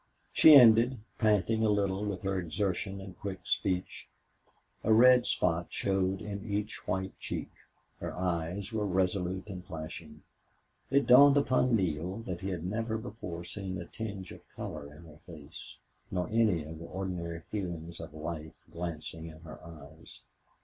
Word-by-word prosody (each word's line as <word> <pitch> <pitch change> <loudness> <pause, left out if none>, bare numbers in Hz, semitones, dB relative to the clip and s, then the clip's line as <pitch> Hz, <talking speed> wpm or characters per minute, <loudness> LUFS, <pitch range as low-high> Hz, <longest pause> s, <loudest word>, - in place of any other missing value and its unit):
She 155 -2 +9
ended, 120 0 +7 0.2
panting 110 0 +2
a 110 - +3
little 100 0 +1
from 95 - -6
her 95 -1 0
exertion 95 +2 -2
and 95 -1 -9
quick 95 -2 -5
speech. 90 -2 -2 0.7
A - - +2
red 125 +2 +7
spot 85 -1 +1
showed 95 -1 0
in 100 -1 -5
each 105 0 -4
white 95 +1 -2
cheek. - - -5 0.5
Her - - -4
eyes 90 +3 -2
were 105 -2 0
resolute 95 0 0
and 90 -1 -7
flashing. 80 -3 -8 0.7
It 140 +1 +3
dawned 140 +3 +8
upon 130 -3 +3
Neale 90 -1 -1
that 90 -2 -5
he 95 - -3
had 90 -3 -4
never 110 +3 -2
before 105 -7 -7
seen 95 +1 -5
a 85 - -6
tinge 100 -2 -6
of - - -11
color 70 0 -6
in 75 +3 -14
her 80 -1 -15
face, 80 -1 -11 0.3
nor 90 -1 -1
any 110 -8 +2
of 80 +1 -9
the 85 - -8
ordinary 85 -3 -4
feelings 85 -5 -4
of 80 -2 -8
life 80 0 -6 0.2
glancing 80 -1 -5
in 80 -1 -11
her 80 0 -11
eyes. 80 -2 -13
95 Hz, 155 wpm, -31 LUFS, 85-105 Hz, 0.7 s, She